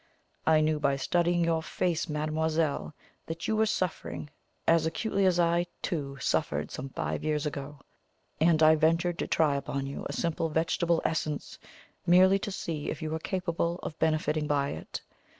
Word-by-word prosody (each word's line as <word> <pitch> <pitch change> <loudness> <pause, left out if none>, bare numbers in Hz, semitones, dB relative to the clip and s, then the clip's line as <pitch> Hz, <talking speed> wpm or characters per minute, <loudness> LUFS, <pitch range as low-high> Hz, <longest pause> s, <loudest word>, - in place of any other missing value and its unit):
I 155 -1 +5
knew, 155 0 +1
by 140 -2 +2
studying 175 +5 +1
your 165 -1 +1
face, 170 0 -1
mademoiselle, 155 0 -1 0.3
that 165 +1 -4
you 220 - +1
were 220 0 +3
suffering 180 -6 -3 0.4
as 165 -1 +4
acutely 195 +3 +1
as 180 -1 +2
I, 170 +1 +2 0.2
too, 140 -6 -3
suffered 75 - 0
some 135 +2 -5
five - - -3
years 150 -1 0
ago, 145 0 -5 0.6
and 160 0 +4
I 155 0 +8
ventured 165 +3 +2
to - - -1
try 150 -3 +2
upon 140 0 -3
you 140 - -5
a - - -3
simple 165 -1 -1
vegetable 165 +1 +1
essence, 155 -2 -2 0.5
merely 185 +3 +6
to 205 - -4
see 160 -5 -4
if 160 +1 -4
you 155 - -3
were 160 - -1
capable 170 -1 -1
of 155 - -6
benefiting 155 -1 +1
by 140 -1 +1
it. 80 - -6
160 Hz, 170 wpm, -29 LUFS, 150-170 Hz, 0.6 s, I